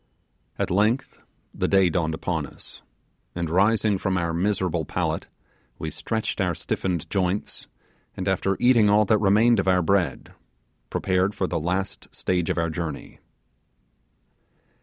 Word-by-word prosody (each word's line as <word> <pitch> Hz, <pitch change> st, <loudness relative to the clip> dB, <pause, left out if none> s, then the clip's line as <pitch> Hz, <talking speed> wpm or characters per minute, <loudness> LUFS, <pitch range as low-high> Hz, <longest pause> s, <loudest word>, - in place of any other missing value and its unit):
At -, -, -1 dB
length 110 Hz, +8 st, +1 dB, 0.3 s
the -, -, -1 dB
day 95 Hz, -2 st, +4 dB
dawned 80 Hz, -2 st, 0 dB
upon 80 Hz, -3 st, -2 dB
us, -, -, -9 dB, 0.5 s
and 85 Hz, -2 st, -2 dB
rising 105 Hz, +2 st, +3 dB
from 95 Hz, -2 st, 0 dB
our 85 Hz, -1 st, -1 dB
miserable 90 Hz, -2 st, 0 dB
pallet, -, -, -2 dB, 0.5 s
we -, -, -4 dB
stretched 110 Hz, -1 st, -2 dB
our -, -, 0 dB
stiffened 85 Hz, -3 st, -2 dB
joints, 95 Hz, 0 st, -2 dB, 0.5 s
and -, -, -3 dB
after 95 Hz, 0 st, +1 dB
eating 120 Hz, -4 st, +5 dB
all 105 Hz, +1 st, +5 dB
that 105 Hz, +1 st, +3 dB
remained 110 Hz, +3 st, +4 dB
of 95 Hz, -, -1 dB
our 90 Hz, -1 st, +3 dB
bread, 90 Hz, -6 st, 0 dB, 0.6 s
prepared 95 Hz, +2 st, 0 dB
for 95 Hz, -, 0 dB
the 85 Hz, -2 st, -2 dB
last 95 Hz, +5 st, -3 dB
stage 90 Hz, -2 st, -1 dB
of -, -, 0 dB
our 85 Hz, -1 st, 0 dB
journey. 80 Hz, -3 st, -5 dB
95 Hz, 140 wpm, -24 LUFS, 85-105 Hz, 0.6 s, eating